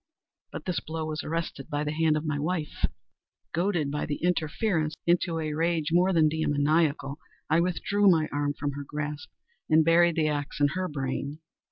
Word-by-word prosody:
But - - -7
this 180 -3 -1
blow 160 0 -4
was 155 -1 -3
arrested 165 -4 -4
by 145 0 -1
the 150 - -2
hand 155 0 +2
of 155 - -4
my 150 -2 -1
wife. 155 0 -1 0.7
Goaded, 170 -4 0
by 150 - -2
the 150 - -1
interference, 165 -1 0
into 170 -1 +2
a 155 -2 -2
rage 165 -1 0
more 180 +3 +4
than 160 -4 +4
demoniacal, 150 -1 +1 0.3
I 160 - +5
withdrew 195 +3 +2
my 160 -4 +4
arm 145 0 -1
from 145 0 -2
her 145 +1 -6
grasp 150 +1 -5 0.4
and 155 0 +5
buried 170 0 +5
the 160 -2 +2
axe 145 -1 -3
in 145 0 +4
her 185 +6 -2
brain. 140 0 -3
155 Hz, 180 wpm, -27 LUFS, 145-170 Hz, 0.7 s, I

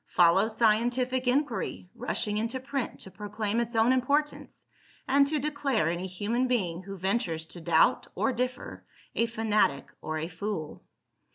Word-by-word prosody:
Follow 175 +4 +4
scientific 240 +3 +1
inquiry, 250 -7 0
rushing 230 -3 -2
into 230 +4 -2
print 270 0 -3
to 190 - -10
proclaim 210 +2 -2
its 235 0 -2
own 225 +3 +4
importance, 285 +4 -1 0.4
and 280 +1 +5
to 305 +1 0
declare 280 - 0
any 175 +2 -2
human 215 +7 -1
being, 185 -9 0
who 195 +1 -8
ventures 185 -4 -1
to 170 +1 -9
doubt - - +3
or 265 - +1
differ, 250 +1 -4 0.3
a 230 - +1
fanatic 215 -10 +1
or 155 0 -3
a 160 +1 -3
fool. 170 -1 -5
225 Hz, 150 wpm, -28 LUFS, 190-255 Hz, 0.4 s, and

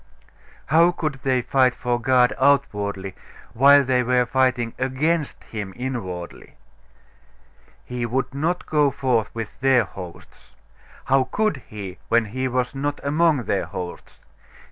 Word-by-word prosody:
How 165 +2 +4
could 155 -5 -4
they 130 -3 +1
fight 130 -1 +2
for 120 -1 -2
God 125 0 +3
outwardly, 105 -8 +1 0.4
while 140 +3 +6
they 125 -1 +2
were 125 0 +2
fighting 125 -2 +1
against 145 +4 -1
him 105 -4 -6
inwardly? 105 -9 -6 1.3
He 125 -1 -3
would 130 +3 -2
not 165 +6 -1
go 150 -2 +2
forth 125 -5 0
with 115 -2 -6
their 130 -2 +4
hosts. 90 -3 -12 0.5
How 135 0 +3
could 215 -8 -1
He, 100 -3 -8
when 115 0 +3
He 130 +5 -3
was 125 0 -1
not 145 +1 -3
among 150 -1 +2
their 100 -3 -1
hosts? 90 -1 -8
130 Hz, 130 wpm, -23 LUFS, 115-140 Hz, 1.3 s, while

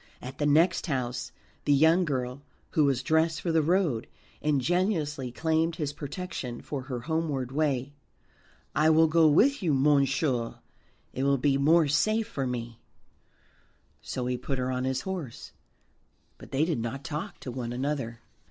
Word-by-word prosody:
At 130 +2 -9
the 145 - +2
next 165 +5 +3
house 125 -4 -2 0.3
the 145 - +4
young 160 +5 +5
girl, 130 -2 -3 0.3
who 155 - +3
was 135 -2 +1
dressed 160 +2 +2
for 170 - -1
the 160 -1 +3
road, 165 - +1 0.3
ingenuously 150 - 0
claimed 160 +4 0
his 150 -3 -3
protection 145 -5 -5
for 140 -3 -5
her 130 -2 -5
homeward 150 -4 -2
way. 140 -2 0 0.8
"I 155 +1 +3
will 160 +1 +6
go 160 0 +4
with 245 - +4
you, 160 -6 +2
monsieur, 135 -3 +2 0.6
it 130 - -3
will 140 0 +3
be 135 +1 +2
more 160 +3 +4
safe 215 +10 +1
for 135 -2 -3
me." 120 -2 -5 1.2
So 125 - -4
he 125 0 -1
put 135 - -3
her 130 0 -1
on 130 0 -1
his 130 0 -1
horse, 180 -11 -6 0.9
but - - -12
they 140 +3 +1
did 160 -7 -1
not 120 +4 -4
talk 160 -1 -5
to 125 - -5
one 120 -1 -4
another. 125 -3 -3
145 Hz, 160 wpm, -28 LUFS, 130-160 Hz, 1.2 s, will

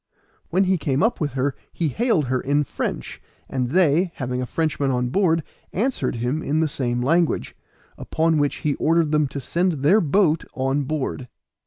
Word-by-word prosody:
When 185 +3 +2
he 185 -2 +1
came 140 -2 0
up 225 - +1
with 145 -2 -1
her 135 +1 0 0.2
he 165 -3 -1
hailed 220 - +1
her 130 0 -1
in 145 +2 +1
French, - - -4 0.3
and 125 -2 -2
they, 170 +2 +3
having 125 -1 -3
a 125 - -3
Frenchman 150 -3 -1
on 125 -1 0
board, 165 0 +2 0.3
answered 240 - -1
him 125 +7 -1
in 155 +1 0
the 160 - +2
same 120 -5 -2
language; 165 +4 +1 0.4
upon 160 -1 +1
which 145 -1 +1
he 145 - +3
ordered 165 -1 +2
them 150 -1 +2
to 140 +1 -6
send 175 +7 0
their 195 +9 +5
boat 165 0 +2
on 135 +2 0
board. 135 -3 -3
150 Hz, 180 wpm, -23 LUFS, 135-170 Hz, 0.4 s, their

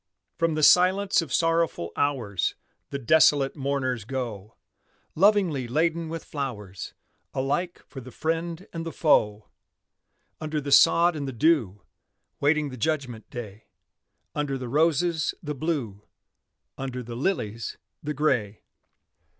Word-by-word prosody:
From 165 -2 0
the 155 - -1
silence 185 +4 +5
of 160 -5 -7
sorrowful 165 - +1
hours 120 -10 0 0.3
The 140 - -3
desolate 140 +1 +4
mourners 135 -4 -1
go, 115 -4 -5 0.6
Lovingly 185 - +3
laden 160 +5 0
with 165 0 -5
flowers 105 - -6 0.4
Alike 155 +7 -2
for 135 - -9
the 130 - -10
friend 165 +6 -3
and 165 -1 -4
the 165 - -5
foe: 105 -11 +2 0.9
Under 155 -1 -2
the 140 -1 -5
sod 170 +4 +6
and 145 -2 -4
the - - -3
dew 120 - +1 0.6
Waiting 150 0 +2
the 130 - -8
judgment 125 -4 -2
day; 110 -3 -8 0.7
Under 145 -2 -2
the 125 -2 -6
roses, 160 +3 +1
the 150 -1 -3
Blue, 135 -9 -3 0.8
Under 130 -2 -4
the 120 0 -7
lilies, 115 - -2 0.2
the 150 0 -4
Gray. 110 -8 0
140 Hz, 125 wpm, -26 LUFS, 120-165 Hz, 0.9 s, sod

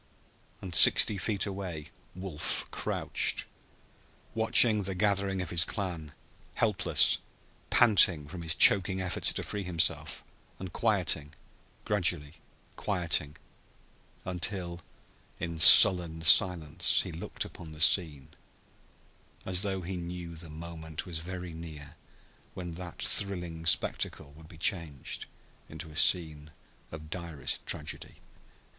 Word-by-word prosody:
And 95 -2 -9
sixty 100 +4 +7
feet 100 -2 -3
away 95 -6 -8 0.2
Wolf 90 -5 -5
crouched, - - -2 0.9
watching 110 -1 +3
the 95 -1 -6
gathering 100 -1 -2
of 90 - -10
his 85 -1 +4
clan, 85 -6 -7 0.4
helpless, - - +2 0.5
panting 90 -10 +2
from 90 +2 -10
his 80 -1 -3
choking 95 -1 +4
efforts 90 -1 0
to - - -5
free 105 - -7
himself, 90 -4 -2 0.3
and 95 -2 -10
quieting, 85 -9 -2 0.5
gradually 85 -6 -3 0.4
quieting, 85 -6 -3 0.9
until 90 -1 -5 0.6
in 85 -1 -7
sullen 80 0 +8
silence 85 -3 +2
he - - -9
looked - - -7
upon 80 -2 -13
the 75 - -13
scene, 80 -5 +2 1.2
as 90 -1 -1
though 95 -2 -3
he 90 +1 -7
knew 85 -1 -9
the 80 0 -10
moment 80 0 -9
was 85 -4 -4
very 90 0 -9
near 80 -3 -12 0.6
when 90 -2 -8
that 85 0 -10
thrilling 90 -5 +3
spectacle 70 - -1
would 80 +1 -17
be 80 - -15
changed 80 -5 -4 0.4
into 80 +1 -11
a - - -15
scene 80 -3 0 0.4
of 75 0 -12
direst 80 -7 -4
tragedy. 75 0 -5
85 Hz, 115 wpm, -27 LUFS, 80-95 Hz, 1.2 s, sullen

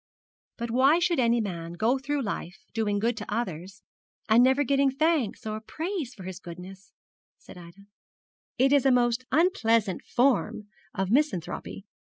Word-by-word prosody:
'But 235 -1 -4
why 265 +6 +4
should 350 -3 +1
any 235 -1 +3
man 170 -6 -4
go 230 +9 +1
through 280 +1 -2
life 185 -4 -5 0.2
doing 215 -2 0
good 230 +3 0
to 210 0 -7
others, 195 -4 -4 0.4
and 230 +2 +5
never 265 +3 +3
getting 275 0 +2
thanks 295 -5 0
or 215 0 -3
praise 315 - -5
for 195 - -11
his 185 0 -7
goodness,' 185 +2 -11 0.5
said - - -15
Ida. 180 +3 -14 0.7
'It 270 +2 +3
is 275 -2 +4
a - - +5
most 245 0 +2
unpleasant 230 - +2
form 230 -5 0 0.3
of 190 0 -1
misanthropy. 175 - -1
230 Hz, 155 wpm, -27 LUFS, 195-270 Hz, 0.7 s, and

